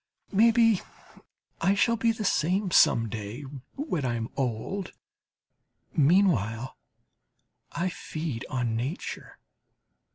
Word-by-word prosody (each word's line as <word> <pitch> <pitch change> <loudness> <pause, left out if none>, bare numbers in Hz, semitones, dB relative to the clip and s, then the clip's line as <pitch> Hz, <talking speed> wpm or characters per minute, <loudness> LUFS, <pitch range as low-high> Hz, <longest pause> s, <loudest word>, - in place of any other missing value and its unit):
Maybe, 225 0 +4 0.8
I 195 +1 +3
shall 230 +3 +3
be 230 0 +2
the 220 -2 -4
same, 185 +4 +1
some 115 -7 +5
day, 110 +5 -6 0.3
when 275 - -2
I 120 -2 0
am 115 -1 -3
old; 135 - -3 1.0
meanwhile 135 - +2 1.0
I 175 +2 -1
feed 155 -7 -5
on 120 -3 -1
nature. 130 +9 -5
160 Hz, 100 wpm, -27 LUFS, -, 1.0 s, some